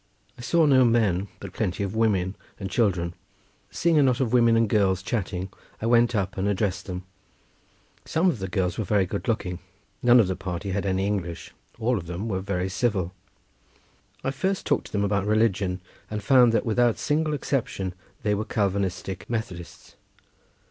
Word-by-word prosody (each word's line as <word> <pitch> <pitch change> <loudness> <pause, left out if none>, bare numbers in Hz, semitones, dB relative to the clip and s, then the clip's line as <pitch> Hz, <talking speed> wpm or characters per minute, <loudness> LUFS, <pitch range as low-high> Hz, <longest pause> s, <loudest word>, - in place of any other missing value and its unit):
I - - -11
saw 165 +6 +3
no 135 -3 +6
men, 105 -6 +2
but - - -8
plenty 95 +2 -1
of 100 0 -3
women 100 -4 +1 0.2
and 95 -1 -5
children. 90 -6 +1 0.6
Seeing 165 -2 +2
a - - +6
knot 130 -3 +3
of 125 -3 0
women 115 -2 +5
and 115 -1 +3
girls 95 -3 +2
chatting 95 -4 -2 0.3
I - - -4
went 120 0 +4
up 100 0 -1
and 95 - 0
addressed 100 -1 -1
them—some 95 - -6
of 160 - +1
the 95 - -3
girls 90 -1 -1
were - - +1
very 100 0 +2
good 100 +5 -5
looking—none 105 +4 0
of 115 - +5
the 95 - -1
party 95 +2 -4
had 100 +1 -1
any 95 0 +1
English; 90 -5 -3 0.2
all 120 0 +1
of 85 - -10
them 90 +6 -4
were 95 -4 -1
very 95 -1 -2
civil. 95 -2 -1 1.1
I 135 - 0
first 190 +8 -1
talked - - 0
to - - -17
them 100 -1 0
about 100 -1 0
religion, 100 -4 +1 0.3
and 105 -1 -4
found 125 -1 +6
that 115 - +1
without 120 0 +3
a - - -23
single 155 0 0
exception 110 -10 -2 0.3
they 105 - +2
were 105 +1 -1
Calvinistic 100 -4 -2
Methodists. 95 -7 -6
100 Hz, 175 wpm, -25 LUFS, 95-115 Hz, 1.1 s, no